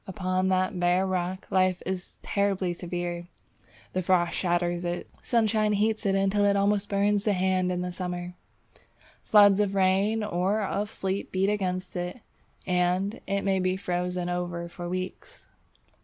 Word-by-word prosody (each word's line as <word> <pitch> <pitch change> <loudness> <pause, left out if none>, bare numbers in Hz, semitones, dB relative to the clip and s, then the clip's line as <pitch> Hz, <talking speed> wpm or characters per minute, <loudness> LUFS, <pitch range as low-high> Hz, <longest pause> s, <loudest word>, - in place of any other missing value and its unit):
Upon 185 -1 -1
that 185 0 +1
bare 180 +2 +3
rock, 185 +1 -2
life 185 -1 +2
is 185 0 -4
terribly 195 -3 0
severe. 175 0 -4 0.7
The 185 - 0
frost 180 -1 +2
shatters 175 -1 0
it, 175 0 -3
sunshine 220 -3 +2
heats 215 +1 +1
it 195 - +2
until 195 +1 +2
it 200 0 +3
almost 200 0 +1
burns 200 0 +2
the 210 - +2
hand 185 -1 +1
in 180 0 -2
summer. 180 -1 -4 0.9
Floods 205 -2 +6
of 200 -1 +1
rain 195 +3 +2
or 205 +2 0
of 205 +1 -2
sleet 195 -2 -3
beat 190 +1 +1
against 185 -3 -2
it, 180 +6 -4 0.4
and 180 +3 0
it 200 0 0
may 195 -1 +1
be 185 0 0
frozen 180 -1 -2
over 175 -1 -3
for 175 0 -7
weeks. 185 +1 -6
185 Hz, 150 wpm, -27 LUFS, 180-200 Hz, 0.9 s, Floods